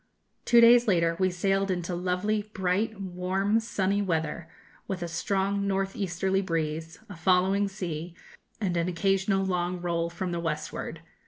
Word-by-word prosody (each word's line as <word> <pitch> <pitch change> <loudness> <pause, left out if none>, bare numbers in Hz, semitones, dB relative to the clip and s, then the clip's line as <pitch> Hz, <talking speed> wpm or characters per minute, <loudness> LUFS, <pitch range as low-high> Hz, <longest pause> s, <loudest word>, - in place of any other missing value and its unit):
Two 235 -1 +6
days 240 +1 +7
later 170 -4 +3
we 185 0 +3
sailed 195 +2 0
into 180 -1 -2
lovely, 185 +4 -1
bright, 195 +3 0
warm, 190 +3 0
sunny 200 -3 0
weather, 160 -3 -2 0.4
with 185 -3 -3
a - - -3
strong 195 +4 -1
north 195 0 -1
easterly 190 0 0
breeze, 160 -2 -3
a 200 - -9
following 190 +4 +2
sea, 175 -4 -5 0.4
and 190 -5 -1
an 170 0 +1
occasional 195 +2 +1
long 180 -1 -1
roll 170 -1 -1
from 175 +1 -4
the 170 - -2
westward. 155 0 -4
185 Hz, 150 wpm, -28 LUFS, 170-195 Hz, 0.4 s, days